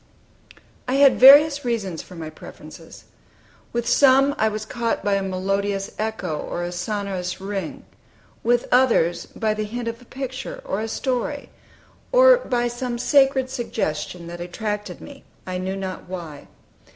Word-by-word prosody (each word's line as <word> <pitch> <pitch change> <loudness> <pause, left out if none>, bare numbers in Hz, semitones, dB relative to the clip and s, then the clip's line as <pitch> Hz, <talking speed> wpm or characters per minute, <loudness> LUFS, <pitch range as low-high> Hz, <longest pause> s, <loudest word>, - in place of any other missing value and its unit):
I 255 - 0
had 275 -1 +5
various 285 +2 +8
reasons 210 -9 -2
for 180 - -13
my 160 -2 -7
preferences. - - -13 0.7
With 235 0 -2
some, 275 0 +5
I 220 - +3
was 215 0 -3
caught 235 +1 -2
by 205 - +1
a 195 - +1
melodious 195 +1 -2
echo, 210 -8 -3
or 175 - -4
a 175 - -4
sonorous 185 0 -3
ring; 195 -3 -5 0.6
with 240 +1 +2
others 230 -10 +3
by 220 -1 -1
the 215 0 -3
hint 235 +3 -5
of 230 +1 -5
a - - -16
picture, 265 - -6
or - - -2
a 225 - -3
story, 265 +4 -3 0.6
or - - +7
by 245 - -1
some 240 0 -4
sacred 270 0 +3
suggestion 170 -8 -3
that 175 +1 -8
attracted 210 +1 -5
me, 280 -1 -12 0.2
I 185 -1 -4
knew 190 +1 -3
not 190 -2 -6
why. 165 -6 -8
220 Hz, 150 wpm, -22 LUFS, 185-255 Hz, 0.7 s, various